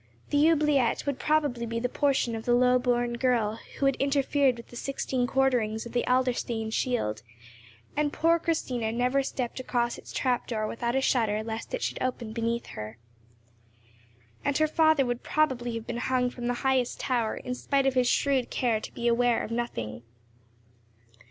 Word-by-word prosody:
The 290 +2 +5
oubliette 300 -6 +2
would 280 -2 -2
probably 290 -6 +1
be 230 0 -2
the 250 - 0
portion 265 -3 +1
of 225 - -6
the 240 - +4
low 250 0 +4
born 240 -1 0
girl 230 -4 +1 0.2
who 275 - 0
had 275 -1 +3
interfered 275 -2 +2
with 235 - -11
the - - -12
sixteen 255 -1 -2
quarterings 245 -5 +1
of 235 - -8
the 240 0 0
Adlerstein 245 -3 0
shield, 170 - -1 0.7
and 295 0 +1
poor 335 +2 +3
Christina 250 -9 -1
never 250 +4 +1
stepped 255 -2 -4
across 240 -2 -1
its - - -12
trap 250 -2 0
door 215 -3 -2
without 235 +2 -2
a 265 - +2
shudder 220 -5 +1
lest 225 - -4
it - - -5
should - - -3
open 245 -3 -3
beneath 230 +1 -1
her. 105 +1 -7 1.5
And 285 - +1
her 310 - +3
father 315 -3 +3
would 245 0 -2
probably 250 -6 0
have 225 -1 -5
been 235 - -4
hung 250 0 0
from 240 -1 -5
the 245 - 0
highest 260 -2 +1
tower, 240 -4 0
in 250 - -4
spite 275 +2 0
of 270 - +3
his 250 -1 +2
shrewd 270 -1 +2
care 235 -4 +1
to - - -8
be 235 - -1
aware 240 0 +3
of - - -6
nothing. 115 - -3
245 Hz, 180 wpm, -28 LUFS, 235-270 Hz, 1.5 s, The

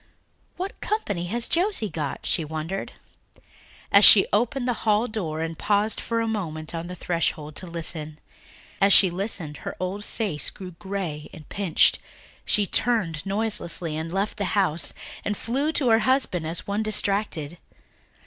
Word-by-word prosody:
"What 385 +5 -5
company 205 - -2
has 235 +5 +2
Josie 355 - +1
got?" 150 -4 -4
she 165 - +1
wondered, 160 +5 -5 1.0
as 200 - +7
she 200 - +10
opened 245 +4 +1
the 245 - +2
hall 215 +2 +2
door 165 -9 -3
and 165 0 -3
paused 205 +4 0
for 230 0 -1
a 225 - -1
moment 160 -8 -4
on 165 0 -4
the 180 - -7
threshold 155 -3 -2
to 185 - -6
listen. 160 -2 -1 0.6
As 195 0 +6
she 190 -3 +6
listened 175 -5 -2
her - - -6
old 190 +3 -3
face 200 - -2
grew 185 -2 -9
grey 175 -5 -5
and 155 -4 -12
pinched; 195 -6 +2 0.5
she 210 - +2
turned 195 -8 0
noiselessly 195 -6 -1
and 160 +1 -4
left 195 +4 -2
the 200 - -1
house, 170 -5 +1 0.3
and 210 - -2
flew 275 +7 -1
to 270 -6 +1
her 225 0 +5
husband 215 - +1
as 165 +1 -3
one 200 +2 -1
distracted. 195 -7 -1
195 Hz, 160 wpm, -25 LUFS, 165-215 Hz, 1.0 s, she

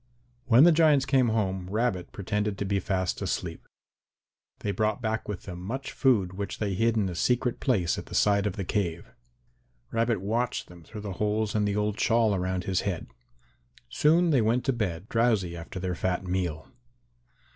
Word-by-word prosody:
When 125 +2 +7
the 175 - +8
giants 155 -4 +4
came 135 -2 +3
home, 95 -4 -1
Rabbit 105 -3 -1
pretended 105 +1 -2
to 100 - -2
be 100 0 0
fast 95 -2 -1
asleep. - - -3 0.9
They 100 - -1
brought 105 +3 0
back 110 -2 -2
with 100 -4 -5
them 90 -1 -8
much 130 +8 -5
food 105 -9 +2
which 100 +1 -5
they 100 -2 -1
hid 115 +4 +1
in 105 -3 +1
a 90 - -4
secret 125 +6 0
place 95 -10 +1
at - - -9
the - - -7
side 100 0 +3
of 100 - -2
the 100 - -4
cave. 85 -4 -2 0.9
Rabbit 115 -1 +1
watched 115 +6 -2
them 90 -1 -13
through 105 +6 -9
the 100 -2 -5
holes 105 0 0
in 105 -1 +1
the 100 0 0
old 105 0 -1
shawl 115 -2 +3
around 95 -1 -1
his 95 -1 0
head. 95 -5 -4 0.8
Soon 165 - +3
they 135 -5 +4
went 115 +3 +1
to 135 - +2
bed, 100 -5 -3
drowsy 110 -7 +1
after 85 +2 -7
their 90 0 -2
fat 90 +2 -2
meal. 90 -4 -2
105 Hz, 185 wpm, -27 LUFS, 95-115 Hz, 0.9 s, the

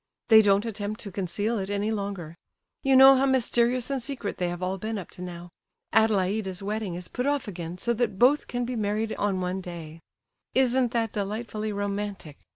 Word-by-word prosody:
They 220 -1 +9
don't 200 0 +3
attempt 215 -1 -4
to 200 - -7
conceal 205 +4 -2
it 190 0 -4
any 205 +2 -1
longer; 200 -6 -4 0.5
you 270 -2 +3
know 265 +1 +10
how 270 +1 +3
mysterious 250 -1 +2
and 270 -2 -1
secret 245 -5 -4
they 180 -1 0
have 175 +1 -5
all 190 +1 -2
been 220 +2 -3
up 190 - -7
to - - -10
now. 175 -1 -8 0.4
Adelaida's 195 -2 +1
wedding 205 -3 -3
is 180 0 -5
put 250 +2 -3
off 285 -3 0
again, 175 -3 -6
so 235 +6 0
that 225 -4 -1
both 260 +6 +4
can 245 0 -2
be 250 +1 -3
married 215 0 -1
on 200 -2 0
one 180 +1 -2
day. 165 -3 -8 0.6
Isn't 255 -1 +3
that 225 -2 0
delightfully 215 +1 -3
romantic? 200 -6 -4
205 Hz, 190 wpm, -26 LUFS, 190-235 Hz, 0.6 s, know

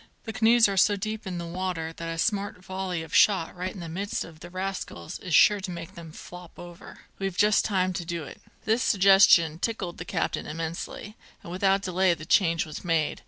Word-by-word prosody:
The 225 - -6
canoes 230 0 +5
are 200 -1 -3
so 205 +2 +4
deep 215 +1 -5
in 180 -2 -4
the 170 - -5
water 170 -2 -4
that 165 0 -6
a 165 - -4
smart 200 -1 -2
volley 185 -3 -4
of 160 - -12
shot 190 -6 +3
right 180 +1 -3
into 185 - -9
the 170 - -6
midst 195 +5 -3
of 160 -2 -14
the 175 - -10
rascals 185 - -5
is 180 -3 -1
sure 210 -1 +6
to 190 - -6
make 170 +1 -7
them 170 -3 -11
flop 180 +2 -12
over. 175 -1 -12 0.2
We've 195 -2 -3
just 210 0 +3
time 185 -3 0
to 175 - -4
do 170 -1 -4
it." 140 - -11 0.2
This 220 +2 +1
suggestion 190 -6 +5
tickled 190 -5 -3
the 165 - -6
captain - - -2
immensely, 165 +6 -6 0.3
and 170 - -9
without 195 +2 +1
delay 185 -1 +2
the 155 - -10
change 165 -2 +2
was 155 -1 -8
made. 165 -3 0
185 Hz, 210 wpm, -26 LUFS, 165-195 Hz, 0.3 s, sure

